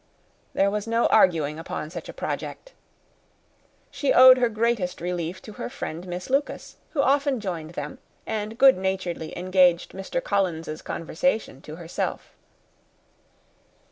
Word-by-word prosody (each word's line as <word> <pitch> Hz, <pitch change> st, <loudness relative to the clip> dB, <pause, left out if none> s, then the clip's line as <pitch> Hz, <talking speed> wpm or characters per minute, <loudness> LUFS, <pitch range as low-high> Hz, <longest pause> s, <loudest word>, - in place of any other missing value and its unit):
There 200 Hz, 0 st, +2 dB
was 210 Hz, +1 st, -3 dB
no 230 Hz, +1 st, +2 dB
arguing 160 Hz, -7 st, +3 dB
upon 155 Hz, -1 st, -5 dB
such 170 Hz, -2 st, -7 dB
a -, -, -7 dB
project. -, -, -5 dB, 1.2 s
She 280 Hz, -2 st, 0 dB
owed 255 Hz, 0 st, +9 dB
her 245 Hz, -1 st, +3 dB
greatest 220 Hz, -5 st, 0 dB
relief 175 Hz, 0 st, -4 dB
to 215 Hz, -, -10 dB
her -, -, -5 dB
friend 180 Hz, -, -6 dB
Miss 180 Hz, 0 st, -5 dB
Lucas, 275 Hz, +2 st, -2 dB, 0.2 s
who 280 Hz, -4 st, +2 dB
often 280 Hz, -1 st, +2 dB
joined 170 Hz, -6 st, -5 dB
them, 260 Hz, -, -6 dB, 0.3 s
and 220 Hz, 0 st, -4 dB
good 265 Hz, -6 st, +6 dB
naturedly 185 Hz, -4 st, -3 dB
engaged 180 Hz, -1 st, +3 dB
Mr. 195 Hz, +6 st, -3 dB
Collins's 165 Hz, -6 st, -1 dB
conversation 165 Hz, -, -2 dB
to 155 Hz, -, -9 dB
herself. 170 Hz, 0 st, -4 dB
190 Hz, 135 wpm, -25 LUFS, 170-235 Hz, 1.2 s, owed